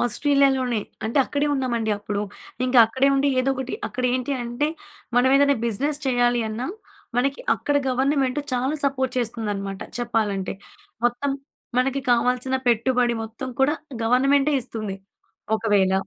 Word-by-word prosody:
ఆస్ట్రేలియాలోనే 265 -2 +2 0.2
అంటే 230 +6 0
అక్కడే 290 +1 -1
ఉన్నామండి 240 -5 -1
అప్పుడు. 205 0 -3 0.4
ఇంకా 255 0 +3
అక్కడే 260 +4 +2
ఉండి 275 +1 +2
ఏదో 265 +1 +1
ఒకటి 260 0 -4
అక్కడ 255 - -4
ఏంటి 255 +2 -1
అంటే 240 +6 -1 0.5
మనం 250 +1 +5
ఏదైనా 280 -1 +4
బిజినెస్ 280 +7 -1
చేయాలి 245 -1 +2
అన్నా 230 +4 -3 0.5
మనకి 275 +3 +1
అక్కడ 290 - -1
గవర్నమెంట్ 265 +1 +1
చాలా 255 +4 0
సపోర్ట్ 265 -2 0
చేస్తుందన్నమాట 205 -4 -3 0.2
చెప్పాలంటే. 215 -5 -1 0.5
మొత్తం 245 +4 +1 0.5
మనకి 270 +2 +1
కావాల్సిన 250 +2 +2
పెట్టుబడి 240 +1 +2
మొత్తం 230 +4 -7
కూడా 285 +3 +4 0.3
గవర్నమెంటే 275 +5 +3
ఇస్తుంది. 215 -4 -5 0.6
ఒకవేళ 205 -4 +2
250 Hz, 125 wpm, -23 LUFS, 230-275 Hz, 0.6 s, మనం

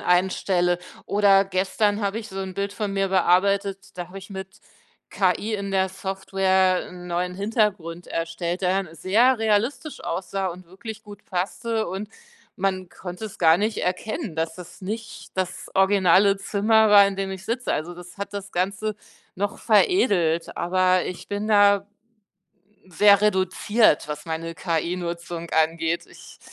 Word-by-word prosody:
einstelle. 180 -1 +2 0.3
Oder 200 -1 +4
gestern 195 +2 0
habe 200 +2 -1
ich 225 -1 -8
so 190 0 -6
'n 190 -1 -5
Bild 200 +1 -2
von 205 -1 -3
mir 195 0 +1
bearbeitet, 195 +1 +1
da 175 -1 -5
habe 190 +2 -9
ich 195 +1 -12
mit 190 -1 -8 0.5
KI 195 +3 0
in 200 -1 -4
der 190 -1 +2
Software 190 -1 0
'n 180 0 -10
neuen 180 +1 -2
Hintergrund 200 -5 -1
erstellt, 170 +2 -3
der 190 +1 +2
dann 170 -4 -12
sehr 225 - +3
realistisch 225 +8 0
aussah 195 +1 -3
und 180 0 -9
wirklich 220 +4 -9
gut 205 -1 -12
passte, 220 +5 -2
und 195 +4 -5 0.5
man 185 -1 -1
konnte 180 +3 -8
es 205 - -12
gar 165 -1 +6
nicht 215 +2 -1
erkennen, 205 - -3
dass 160 +1 -2
es 180 -2 -11
nicht 220 +4 -6
das 185 -1 -3
originale 195 0 +4
Zimmer 215 +2 +3
war, 200 -1 +8
in 200 - -2
dem 195 0 -2
ich 190 -1 -7
sitze. 240 +2 -2
Also, 165 +4 -3
das 180 +2 -13
hat 200 0 -5
das 200 0 -6
Ganze 200 +4 -1 0.4
noch 200 +2 -2
veredelt, 200 - +2
aber 185 0 +2
ich 180 0 -7
bin 205 +1 -3
da 200 -2 +5 1.0
sehr 200 +3 +5
reduziert, 205 -2 +2
was 150 +1 -6
meine 165 0 -4
KI-Nutzung 170 +1 -3
angeht. 165 +1 +1
Ich - - -15
190 Hz, 155 wpm, -24 LUFS, 180-205 Hz, 1.0 s, war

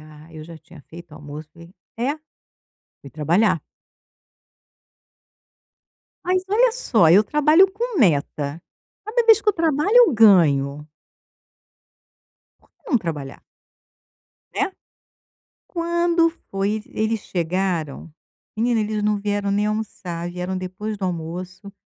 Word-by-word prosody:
“Ah", 155 +1 -16
eu 155 - -8
já 165 0 -11
tinha 175 -4 -17
feito 170 0 -13
o - - -10
almoço, 150 0 -10
falei: 170 +2 -15 0.2
“É?” 260 +6 -1 0.8
Fui 140 - -12
trabalhar. 165 +6 +1 2.6
Mas, 365 +1 +1
olha 460 +4 +3
só, 230 - +2
eu 195 +5 +7
trabalho 305 - +4
com 455 +1 -4
meta. 150 - 0 0.4
Cada 460 +3 0
vez 450 -1 +7
que 430 - -2
eu - - +5
trabalho 325 - +1
eu 485 -9 +7
ganho. 150 - +4 1.7
Por - - -31
que - - -48
não 255 - +4
trabalhar? 150 -8 -6 1.1
Né. - - 0 1.0
Quando 340 -1 +1 0.2
foi 200 +2 -1
e - - -8
eles 220 0 0
chegaram, 170 -4 -3 0.4
menina, 230 +1 +1
eles 215 0 -2
não 210 0 +1
vieram 205 0 -2
nem 205 +1 +1
almoçar, 180 -5 -4
vieram 180 +1 -4
depois 185 +4 -5
do 195 - -4
almoço. 180 +3 -6
200 Hz, 125 wpm, -21 LUFS, -, 2.6 s, eu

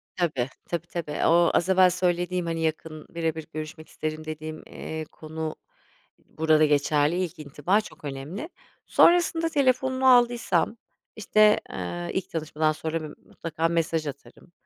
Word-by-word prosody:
Tabii, 150 -8 0 0.2
tabii 170 0 -3
tabii. 155 -4 -3
O 170 +1 +5
az 175 +2 +2
evvel 185 -1 +6
söylediğim 180 0 0
hani 165 -1 -2
yakın 155 -1 -3
birebir 160 -2 -3
görüşmek 155 0 -7
isterim 155 0 -5
dediğim, 155 0 -6
eee, 160 0 -6
konu 160 0 -6 0.7
burada 155 -1 +3
geçerli. 145 +1 +2
İlk 170 -4 -6
intiba 150 +7 0
çok 210 - -13
önemli. 145 - -6 0.4
Sonrasında 330 -1 +4
telefonunu 260 -2 +2
aldıysam 240 -2 +3 0.4
işte, 215 -1 +4
eee, 85 -1 -5
ilk 190 - -2
tanışmadan 155 -1 0
sonra 160 +1 -3
bir, 150 - -11
mutlaka 165 0 -2
mesaj 165 -2 0
atarım 140 +4 -10
160 Hz, 135 wpm, -26 LUFS, 155-180 Hz, 0.7 s, evvel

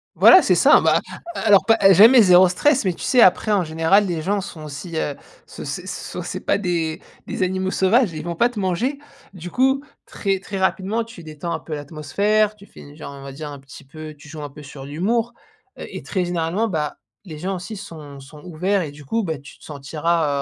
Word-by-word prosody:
Voilà, - - +8
c'est - - +2
ça. - - +6
Ben, - - +3 0.4
a - - -4
alors, 205 -3 +5
pas 225 -1 +4 0.2
jamais 230 +7 +8
0 180 -2 +6
stress 275 +9 +2
mais 185 -3 0
tu - - -10
sais, 250 - +3
après, 215 +3 +4
en 200 -3 +2
général, 165 +6 +2
les 170 -3 -2
gens 200 +5 -1
sont 165 -5 -9
aussi, 150 +3 -7
heu, 145 -2 -2 0.3
ce - - -10
c'est - - -6
so - - -6
c'est - - -5
pas - - +1
des 170 -5 -2 0.3
des - - -2
animaux 185 +1 -1
sauvages. 205 +3 +2
Ils 155 -2 -7
vont 170 0 -4
pas 240 +8 +3
te 240 -4 -7
manger. 205 +9 -1 0.4
Du 180 -1 -9
coup, 265 +2 +2 0.2
très, 195 -2 -2
très 195 +1 -6
rapidement, 195 +4 0
tu 225 -6 -13
détends 155 +2 -6
un 160 - -3
peu 160 - -8
l'atmosphère, 200 +9 0
tu 200 -1 -16
finis, 145 -6 -15
genre, 145 -2 -8
on 140 - -11
va 135 0 -8
dire, 150 +2 -7
un 140 - -9
petit 135 +1 -14
peu 155 +2 -10
tu 145 - -15
joues 155 -1 -8
un 145 - -6
peu 150 +2 -13
sur 135 -1 -10
l'humour, 220 +11 -1 0.4
heu - - -7
et - - -8
très 185 -3 -2
généralement, 175 +5 -1
bah, 155 -7 -3 0.3
les 160 -5 -9
gens 190 +5 -3
aussi 185 +5 -7
sont 155 -8 -10
sont 145 +3 -14
ouverts 185 +3 -1
et 155 -4 -5
du 145 0 -14
coup, 225 +11 -1
beh, 160 -6 -3
tu 140 - -15
te - - -20
sentiras, 150 0 -1
175 Hz, 230 wpm, -21 LUFS, 155-200 Hz, 0.4 s, Voilà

